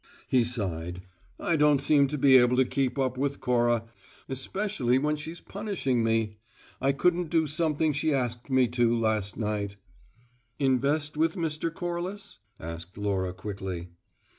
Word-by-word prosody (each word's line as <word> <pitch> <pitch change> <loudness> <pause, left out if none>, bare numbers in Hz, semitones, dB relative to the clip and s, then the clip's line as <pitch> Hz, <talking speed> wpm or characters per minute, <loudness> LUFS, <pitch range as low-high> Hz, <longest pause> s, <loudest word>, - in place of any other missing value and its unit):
He 125 -2 +3
sighed. 90 -7 -3 0.4
"I 170 - +1
don't 150 -2 +4
seem 140 0 +4
to 150 +2 -3
be 135 -1 +6
able 125 0 +4
to 130 - +5
keep 135 +1 -1
up 130 -1 0
with 140 0 -1
Cora, 120 -2 +2 0.4
especially 130 - 0
when 150 +3 +1
she's 160 +3 -7
punishing 190 - -2
me. 110 -1 0 0.4
I 135 +1 +3
couldn't 175 +4 +1
do 160 -1 +2
something 155 0 +1
she 150 +2 0
asked 125 -2 -2
me 130 -1 +4
to, 120 -1 +2
last 110 -3 0
night 105 -2 -2 0.5
" 120 -1 -38
"Invest 145 +4 +1
with 160 +3 +2
Mr. 165 -2 -1
Corliss?" 175 +4 -5 0.2
asked 85 +3 -8
Laura 95 -3 -1
quickly. 95 -2 -6
130 Hz, 150 wpm, -28 LUFS, 115-150 Hz, 0.5 s, be